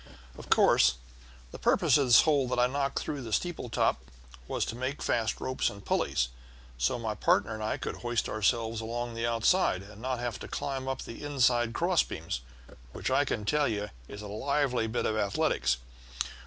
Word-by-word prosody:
"Of - - -11
course 65 - +5 0.6
the - - -9
purpose - - +3
of 140 -3 +3
this 120 - +8
hole 145 -4 +2
that 125 - -1
I 125 - +5
knocked 140 +2 -1
through 145 -2 -3
the 115 -3 -7
steeple 165 -1 -1
top - - +1 0.5
was - - -1
to - - -5
make 130 +4 -3
fast 110 -1 0
ropes 130 - 0
and 100 0 -11
pulleys, - - +1 0.5
so 60 - +1
my 115 -2 -2
partner 105 +1 +2
and 110 0 -5
I 110 - -1
could - - -5
hoist 120 -1 -1
ourselves 115 +1 0
along 120 +1 -4
the 115 0 -1
outside, 115 - +2
and 105 +1 -13
not 130 +1 -1
have 120 -2 -3
to - - -7
climb 135 -2 -3
up 135 -1 -2
the 115 - -9
inside 120 -5 +2
cross 175 +3 +3
beams, 80 -7 -4 0.5
which, - - -3
I - - +3
can 105 - -2
tell 150 +6 +2
you, 105 -2 -2 0.2
is 105 +1 -8
a - - -6
lively 125 +2 0
bit 110 - -1
of 110 - 0
athletics. 70 - +1
120 Hz, 195 wpm, -29 LUFS, 105-130 Hz, 0.6 s, this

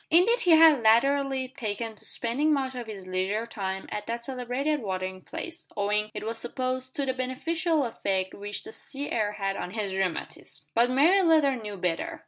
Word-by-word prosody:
Indeed 390 +9 +5
he 355 - +2
had 315 -4 +7
latterly 265 +3 +3
taken 225 -3 -4
to - - -11
spending 270 +7 +1
much 270 -3 0
of 245 -2 -6
his 200 -4 -7
leisure 190 +4 -1
time 190 -4 -4
at 210 0 -4
that 235 +1 -3
celebrated 265 +4 -1
watering 185 -2 -3
place, 335 - -8
owing, 210 +1 +1
it - - -4
was 225 +1 -3
supposed, 255 +2 -3
to 280 - -1
the 260 - 0
beneficial 300 +5 0
effect 190 -5 -1
which 205 +1 -6
the 435 - -9
sea 285 -8 -6
air 210 -2 0
had 195 -1 -2
on 180 - -4
his 200 -1 -3
rheumatism. 185 -6 -3
But 235 +2 +4
May 315 +10 +5
Leather 310 -6 +4
knew 210 -4 -6
better. 190 - -2
240 Hz, 185 wpm, -27 LUFS, 205-280 Hz, -, had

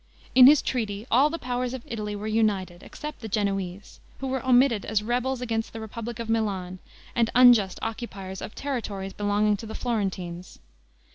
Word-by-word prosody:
In 255 -1 +9
this 285 +1 +7
treaty 215 -4 -2
all 270 +6 +5
the 330 - -3
powers 250 -2 -2
of 250 - -8
Italy 210 -2 -4
were 205 +1 -6
united, 205 -5 0
except 300 -1 -8
the 225 - -6
Genoese, 195 -2 -3 0.2
who 270 - -6
were 265 0 -2
omitted 250 -4 +4
as 210 -1 0
rebels 250 +3 -1
against 225 -2 -2
the 225 - -6
republic 225 +1 -6
of 230 -1 -5
Milan, 195 -5 -1 0.4
and 230 -2 +2
unjust 240 -7 +6
occupiers 205 -5 -5
of - - -7
territories 210 -8 -4
belonging 205 0 +1
to 225 - -8
the 220 - -7
Florentines. 185 -6 -3
220 Hz, 170 wpm, -26 LUFS, 200-245 Hz, 0.4 s, In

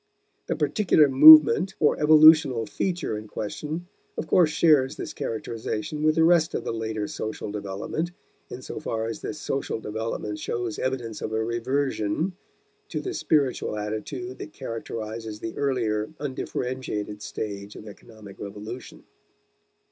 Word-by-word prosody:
The - - -1
particular 175 -8 +3
movement 155 +5 +8
or 150 - +3
evolutional 155 -6 +6
feature 175 - -2
in 110 - -11
question 150 +11 -5 0.3
of - - -3
course 165 0 +4
shares 150 -4 +3
this - - -6
characterization 115 +5 -4
with 155 0 +3
the 160 - +4
rest 165 -1 +4
of - - -2
the - - -3
later 110 -2 -3
social 110 -1 -5
development, 100 - -4 0.4
in 130 - -8
so - - -6
far 115 -7 -3
as 115 - -5
this 155 - -5
social 135 -5 -3
development 105 -1 -4
shows 120 -2 -3
evidence 125 -4 -3
of - - -4
a 110 0 0
reversion 125 - -1 0.6
to - - -3
the 380 - -4
spiritual 140 - 0
attitude 120 +5 -5
that 155 - -8
characterizes 110 -3 -6
the 115 - -6
earlier, 115 -6 -1
undifferentiated 125 -6 -4
stage 100 -1 -6
of - - -10
economic 105 -1 -13
revolution. 105 +5 -8
120 Hz, 140 wpm, -25 LUFS, 110-150 Hz, 0.6 s, movement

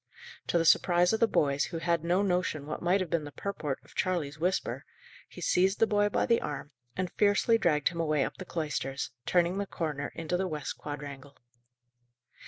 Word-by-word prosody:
To - - +2
the 165 - +2
surprise 175 +2 +4
of 220 - +1
the 230 - +5
boys, 140 -8 +2
who 170 - -5
had 170 -1 0
no 180 +4 +2
notion 180 -6 0
what 155 - -5
might 180 +3 +2
have 180 - -3
been 165 -2 +1
the 145 - -8
purport 150 -7 -3
of - - -18
Charley's 155 -6 -1
whisper, 180 +3 -1 0.5
he - - -11
seized 190 +2 +2
the - - +4
boy 205 -1 +2
by - - +1
the 230 - +3
arm, 145 0 -5 0.3
and 185 -2 -2
fiercely 210 +3 +4
dragged 150 -7 +2
him 170 -2 -7
away 155 -4 +2
up - - -6
the 185 - -6
cloisters, 140 -6 -3 0.2
turning 175 +2 +2
the 200 - -2
corner 150 -6 -3
into 165 +2 -2
the 190 +1 -1
west 150 -4 -4
quadrangle. 145 -1 -8
170 Hz, 195 wpm, -30 LUFS, 150-185 Hz, 0.5 s, the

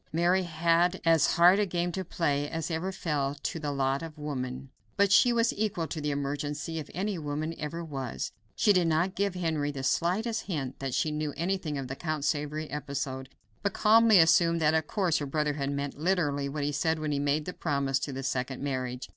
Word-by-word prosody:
Mary 175 +4 +3
had 170 +1 +2
as 165 -3 +4
hard 180 +3 +6
a 210 - +3
game 175 0 -1
to 190 +2 -3
play 145 -4 -1
as 165 0 -3
ever 170 +4 -2
fell 145 -7 -2
to 165 - -2
the 150 -2 -3
lot 135 0 0
of 165 -1 -8
woman, 130 -3 -5 0.3
but 200 -1 +4
she 240 +3 +6
was 235 0 +2
equal 205 -6 -1
to 160 -1 -5
the 150 - -1
emergency 145 +3 -3
if 150 - -7
any 195 0 -2
woman 150 +2 -3
ever 165 +3 -4
was. 135 -5 -4 0.2
She 210 - +4
did 180 -3 +3
not 165 +4 +1
give 200 -1 -1
Henry 160 -5 -1
the 140 -2 -5
slightest 200 - 0
hint 140 -8 -3
that 135 -2 -3
she 155 - +1
knew 150 -1 -3
anything 170 -3 -1
of 135 -2 -4
the 130 - -5
Count 155 -1 -3
of - - -2
Savoy 150 +1 -1
episode, 135 -2 -4 0.3
but 200 - -1
calmly 220 0 +6
assumed 165 0 +5
that 155 -1 +3
of 160 -1 +1
course 185 -6 +1
her 145 - -3
brother 150 +1 0
had 140 -1 -2
meant 140 0 -4
literally 150 -5 0
what 145 +1 -3
he 145 - 0
said 160 +3 0
when 155 -1 -2
he 145 - 0
made 145 +1 0
the 180 - -5
promise 140 -3 0
as - - -2
to 145 - -6
the 135 0 -5
second 130 0 -2
marriage. 130 -2 -3
155 Hz, 220 wpm, -29 LUFS, 140-175 Hz, 0.3 s, hard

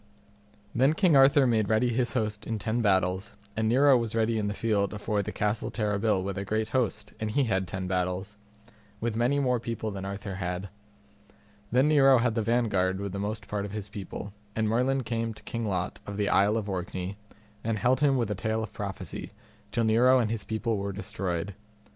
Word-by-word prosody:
Then 135 +6 +3
King 175 -4 +4
Arthur 135 +1 +6
made 110 -4 +2
ready 110 +3 +3
his 120 0 0
host 110 -3 -2
in 110 - -1
ten 110 +3 -1
battles 95 -2 +1 0.2
and 110 +1 +1
Nero 135 +3 +6
was 115 -2 0
ready 115 0 +1
in 105 - -1
the 105 - -2
field 105 -2 0
afore 105 0 -1
the - - -4
Castle 105 +1 -1
Terrabil 105 -2 0
with 100 0 -3
a - - -2
great 110 +2 -1
host, 110 -4 -1
and 110 - -2
he 140 +6 +2
had 95 -6 0
ten 95 +1 -4
battles, 90 +2 -2 0.6
with 115 -1 -2
many 120 +5 +2
more 125 -3 +2
people 110 -1 -4
than 95 -1 -6
Arthur 100 0 -5
had. 90 +1 -3 1.0
Then 130 +4 +4
Nero 135 -3 +6
had 120 -1 +2
the 115 - 0
vanguard 105 -5 +1
with 100 -1 -4
the 100 - -4
most 105 +2 -4
part 105 -1 -2
of 100 0 -6
his 105 -1 -5
people, 100 0 -7 0.2
and 110 -1 +1
Merlin 130 +4 +1
came 115 -1 -2
to - - -14
King 115 -1 -3
Lot 90 -3 -2
of 100 0 -5
the 105 -1 +1
Isle 105 +3 +4
of 105 -2 -3
Orkney, 95 0 -4 0.5
and 115 -1 0
held 125 +3 +2
him 140 -2 +3
with 115 -4 0
a - - +2
tale 110 +2 -1
of 110 -1 -7
prophecy, 100 -2 -6 0.4
till 115 - +1
Nero 120 +4 +5
and 115 -4 +1
his 115 -2 -3
people 110 -1 -1
were 100 0 -2
destroyed. 95 -3 -3
110 Hz, 205 wpm, -28 LUFS, 100-115 Hz, 1.0 s, Arthur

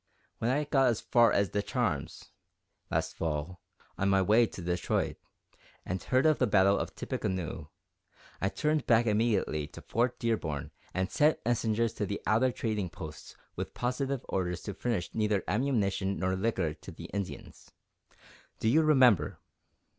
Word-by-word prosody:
When 115 - 0
I 145 +4 +2
got 135 -2 +3
as 115 -3 +1
far 120 -2 +4
as 100 -2 +2
De 105 - 0
Charme's, - - -3 0.6
last - - -1
Fall, 80 +2 -3 0.4
on 100 - +2
my 95 0 +4
way 110 +5 +4
to - - -10
Detroit, 90 0 -1 0.7
and 95 0 -3
heard 130 - +2
of 155 -1 +4
the - - +3
battle 100 -1 +4
of - - -4
Tippecanoe, 85 -5 -3 0.7
I 95 - +2
turned 150 +5 0
back 115 0 +5
immediately 105 -9 +1
to - - -12
Fort 120 +2 0
Dearborn 80 -12 -2 0.2
and 95 0 -2
sent 150 +1 +3
messengers 115 -1 +1
to 105 - -3
the 100 - -3
outer 120 +4 +3
trading 105 -6 -2
posts 80 -4 -9 0.2
with - - -5
positive 130 +1 -2
orders 90 -2 -2
to 100 - -4
furnish 105 -3 -2
neither 105 -3 +1
ammunition 100 -5 0
nor 95 0 0
liquor 95 -6 0
to 75 - -11
the - - -10
Indians. 100 -2 -6 0.9
Do - - -1
you 155 +7 +5
remember?" 130 - +4
105 Hz, 155 wpm, -30 LUFS, 95-120 Hz, 0.9 s, back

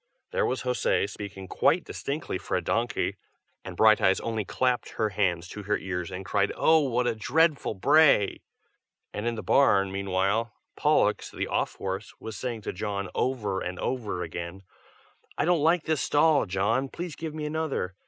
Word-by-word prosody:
There 485 -2 +1
was - - -2
José, 125 -5 +1
speaking 100 -2 -8
quite - - +2
distinctly - - -4
for - - -2
a - - -1
donkey, - - -1 0.5
and - - -8
Brighteyes 110 -3 +5
only 110 -2 -2
clapped 125 +4 -1
her 110 - 0
hands 90 -3 0
to 105 - -7
her 105 +1 0
ears 90 -2 -4
and 95 0 -6
cried 100 +2 +1
"Oh! 160 0 +5
what 125 -4 0
a 120 - +1
dreadful 145 +3 +1
bray!" 140 -1 +4 0.7
and 105 +3 -3
in 120 - 0
the 110 - -6
barn, 100 -8 +4
meanwhile, 100 +3 0 0.2
Pollux, - - +2
the - - -3
off - - -1
horse, 95 +2 -5
was 110 -1 -7
saying 120 -3 -4
to - - -4
John, 100 -1 -3
over 105 -7 -1
and 90 0 -4
over 110 -8 -2
again, 85 +3 -6 0.7
"I 145 - +1
don't 175 -2 +3
like 165 +2 +3
this 155 -3 0
stall, 150 -3 +3
John! 110 +8 0
please 175 +1 -6
give 160 -1 -6
me 155 -1 -4
another. 150 -11 -2
110 Hz, 175 wpm, -27 LUFS, 95-140 Hz, 0.7 s, Brighteyes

